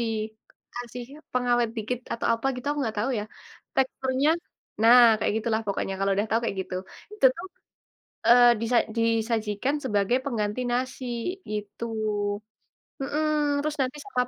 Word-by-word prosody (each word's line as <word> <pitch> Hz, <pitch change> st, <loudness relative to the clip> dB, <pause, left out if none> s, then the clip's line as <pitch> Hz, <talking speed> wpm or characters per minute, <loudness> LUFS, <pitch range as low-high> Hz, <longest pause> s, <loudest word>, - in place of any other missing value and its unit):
dikasih 230 Hz, +2 st, -6 dB, 0.3 s
pengawet 245 Hz, -1 st, +2 dB
dikit, 225 Hz, +3 st, -2 dB
atau 230 Hz, -, -2 dB
apa 230 Hz, +3 st, -3 dB
gitu. 250 Hz, +2 st, -8 dB
Aku 295 Hz, -, -2 dB
enggak 220 Hz, -4 st, -2 dB
tahu 250 Hz, +6 st, 0 dB
ya. 210 Hz, -, -3 dB, 0.5 s
Teksturnya 265 Hz, +2 st, +1 dB, 0.5 s
nah, 240 Hz, +2 st, +8 dB, 0.2 s
kayak -, -, 0 dB
gitu 225 Hz, -, -3 dB
lah 220 Hz, -, +1 dB
pokoknya, 195 Hz, -1 st, -2 dB
kalau 195 Hz, 0 st, +1 dB
udah 205 Hz, +2 st, +1 dB
tahu 225 Hz, -, +3 dB
kayak 210 Hz, -, -2 dB
gitu. 185 Hz, -, -8 dB, 0.4 s
Itu 425 Hz, -, +5 dB
tuh, 350 Hz, -, -6 dB, 0.8 s
eee, 245 Hz, +1 st, +8 dB
disa 235 Hz, +1 st, +2 dB, 0.2 s
disajikan 225 Hz, +2 st, 0 dB
sebagai 205 Hz, +1 st, +2 dB
pengganti 220 Hz, -3 st, -1 dB
nasi, 255 Hz, +1 st, -2 dB, 0.5 s
gitu. 210 Hz, +2 st, -4 dB, 1.1 s
Heeh, 295 Hz, +3 st, 0 dB, 0.3 s
terus 305 Hz, 0 st, -2 dB
nanti 260 Hz, +2 st, -1 dB
sekap 250 Hz, -12 st, 0 dB
235 Hz, 145 wpm, -26 LUFS, 220-255 Hz, 1.1 s, nah